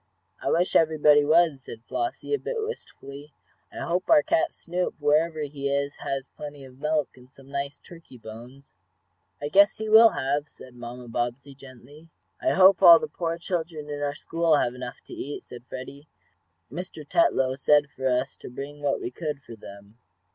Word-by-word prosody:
"I - - -1
wish 175 +2 +1
everybody 150 -2 +5
was," 155 -2 +3
said 115 -3 -11
Flossie, 355 +4 -3
a 430 - +1
bit - - -4
wistfully. 150 - -7 0.4
"I - - -8
hope 175 +2 -2
our 310 -2 +6
cat 335 0 +1
Snoop, 180 +1 -3
wherever 155 +2 +2
he 140 -1 -4
is, 140 +1 -1
has 135 0 -4
plenty 145 -2 -10
of 130 0 -15
milk, 150 -1 0
and 125 0 -18
some 135 0 -17
nice 140 0 -4
turkey 165 -7 -14
bones." 120 +5 -12 0.7
"I 145 - -3
guess 200 +5 +5
he 220 0 -4
will 225 +1 +9
have," 145 -1 -2
said 130 - -14
Mamma 120 0 -9
Bobbsey, 120 +4 -3
gently. 135 +4 -15 0.3
"I - - +2
hope 190 0 +6
all 170 -1 +10
the 235 - -4
poor 165 -5 -3
children 165 -4 -4
in 145 0 -5
our 145 0 -2
school 165 -2 +1
have 120 - 0
enough 125 -1 -8
to - - -13
eat," 145 +2 -6
said 120 0 -12
Freddie. 140 +3 -9 0.6
"Mr. 160 -1 -8
Tetlow 135 - +2
said 145 +1 +3
for 130 -2 -3
us 125 +1 -1
to - - -10
bring 140 +4 -8
what 140 -1 0
we 120 - -5
could 150 +1 -4
for 120 -5 -12
them." 100 +1 -14
145 Hz, 185 wpm, -26 LUFS, 130-165 Hz, 0.7 s, all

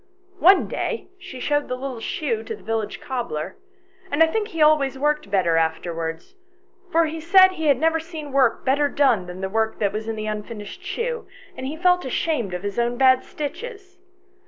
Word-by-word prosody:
One 370 +3 +6
day 465 - -3
she 260 -7 -9
showed 290 +2 0
the 255 - -2
little 255 -2 -5
shoe 230 -1 -2
to - - -4
the - - -18
village 220 -2 -2
cobbler, 195 -10 -4 0.5
and 320 -1 +4
I - - +7
think 420 +6 -1
he 330 -7 -7
always 300 -3 +4
worked 295 -4 0
better 180 -4 +2
afterwards; 165 - -2 0.6
for 330 0 +4
he 320 +1 -4
said 375 +4 +6
he 320 -4 -3
had 280 -3 +5
never 325 +3 +2
seen 320 -3 -8
work 265 -4 +2
better 285 +2 +2
done 245 -12 +2
than 180 +1 -8
the 190 - -1
work 220 +2 0
that 200 -2 0
was 215 +1 -4
in 225 - -2
the 215 0 -4
unfinished 210 - -6
shoe, 465 +6 -3 0.3
and 260 - -5
he 305 +3 -5
felt 360 +1 +3
ashamed 255 - -1
of 180 - -6
his 200 +2 -3
own 240 +1 0
bad 260 0 +5
stitches. 375 - -7
270 Hz, 195 wpm, -23 LUFS, 215-325 Hz, 0.6 s, I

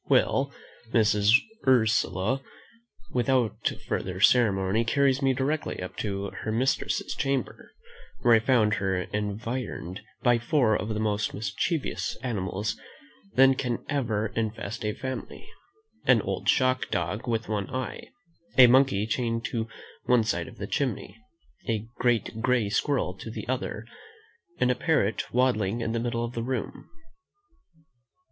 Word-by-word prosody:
Well, - - +3 0.4
Mrs. 105 0 +5 0.3
Ursula, 110 -1 +2 0.7
without 120 -4 +1 0.2
further 95 -1 -2
ceremony, 105 -2 +4
carries 135 +3 +2
me 135 -1 +3
directly 145 +4 -1
up 90 - -6
to 100 -1 -3
her 110 - -3
mistress's 125 +5 0
chamber, 135 -3 -2 0.5
where 120 - +6
I 115 - +7
found 110 -3 +3
her 95 -3 0
environed 105 -1 -4 0.2
by 120 -1 +4
four 120 -2 +2
of 105 - -2
the 105 -1 -2
most 105 -1 -1
mischievous 110 - -2
animals 105 -3 -2 0.6
than 135 +1 +7
can 125 -3 -3
ever 110 -7 -1
infest 110 -1 -3
a 105 - -1
family; 130 - -6 0.6
an - - +5
old - - -2
shock 130 -1 +2
dog 90 +8 -2
with 115 -1 -1
one 105 -3 -2
eye, 130 -1 -5 0.5
a 130 - +11
monkey 120 -5 +4
chained 115 0 -1
to 115 -2 -2 0.4
one 125 -2 +4
side 110 - -1
of - - -12
the - - -4
chimney, - - -2 0.5
a 110 -1 -1
great 115 -2 0
grey 125 -4 +2
squirrel 125 -5 0
to - - -7
the 110 - -7
other, 120 -3 -3 0.7
and 125 - +3
a - - +1
parrot 115 - 0
waddling 120 -4 +1
in 115 - -1
the 115 - -1
middle 120 0 -1
of 120 - -7
the 115 - -3
room. 125 -1 -4
115 Hz, 140 wpm, -27 LUFS, 105-130 Hz, 0.7 s, a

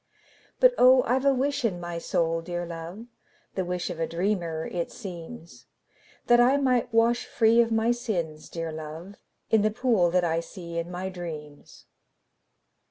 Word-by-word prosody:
But, - - +6
oh, 255 0 +7
I 250 +3 +2
've 270 - -6
a 275 - +6
wish 275 +1 0
in 195 -7 0
my 175 -1 -5
soul, 165 0 0
dear 175 +1 -4
love, 170 +6 -8 0.5
(The 190 - -1
wish 180 0 -3
of 170 - -7
a 165 - 0
dreamer, 170 -3 -2
it 170 -2 -3
seems,) 175 -2 -10 0.6
That 240 0 +5
I 255 +3 +5
might 250 -3 +1
wash 230 +1 +2
free 230 +1 +4
of 230 -1 0
my 225 +1 +2
sins, 180 -11 -3
dear 165 -1 -4
love, 160 +5 -8 0.3
In 220 - +5
the 215 - +3
pool 215 -5 +2
that 180 +1 +2
I 165 -1 +1
see 170 -1 -6
in 170 +1 -4
my 180 +1 -4
dreams. 155 -5 -9
180 Hz, 170 wpm, -26 LUFS, 170-235 Hz, 0.6 s, oh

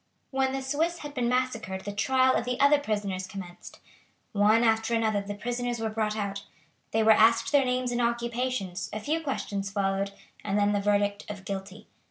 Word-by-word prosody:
When 265 -1 +1
the 270 0 -3
Swiss 315 +6 0
had 290 - -7
been 245 -4 0
massacred 235 -7 -1
the 205 +1 -5
trial 260 +5 +3
of - - +1
the 250 +1 -3
other 285 +1 +5
prisoners 205 -7 -2
commenced. 185 -2 -9 0.5
One 215 +3 +4
after 225 0 +2
another 220 -3 +1
the 205 +1 -6
prisoners 245 +2 -3
were 220 -1 -2
brought 215 -1 -1
out. 200 -1 -3 0.5
They 220 0 +1
were 220 - +6
asked 230 +4 +5
their 285 -2 +4
names 250 0 0
and 245 0 0
occupations, 235 -5 -2
a 215 - -4
few 310 +9 -1
questions 200 -9 -3
followed, 195 0 -1 0.3
and 200 0 -1
then 205 0 +3
the 205 -1 +1
verdict 205 0 0
of 200 -2 -7
"Guilty." 195 +2 -6
220 Hz, 190 wpm, -28 LUFS, 200-250 Hz, 0.5 s, were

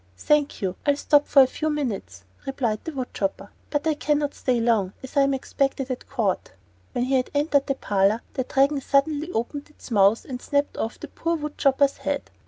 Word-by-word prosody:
"Thank 295 - +1
you, 185 -1 -1
I'll 285 -1 +3
stop 290 0 +3
for 275 - +7
a - - +4
few 310 +4 -2
minutes," 200 - -3 0.2
replied 240 -6 -1
the 325 - -4
wood 260 -4 -5
chopper; 195 0 -3 0.2
"but 290 0 -1
I 320 - +3
can 295 0 +1
not 290 -1 -1
stay 250 -2 0
long, 220 -5 +1
as 265 - -9
I 280 - +5
am 275 0 +3
expected 270 0 -1
at 250 - -6
court." 220 -8 -1 0.4
When 245 - 0
he 260 +2 -1
had 255 -1 +2
entered 285 -1 +2
the 275 - 0
parlor 205 -1 +1
the 260 - -1
Dragon 275 +2 +2
suddenly 295 +4 +1
opened 280 +5 -3
its 300 - -14
mouth 200 +1 +4
and 250 -2 -6
snapped 285 0 0
off 225 - -3
the - - -7
poor 335 +1 -2
wood 300 -2 -5
chopper's 275 0 +3
head. 285 -1 -3
275 Hz, 210 wpm, -24 LUFS, 235-290 Hz, 0.4 s, for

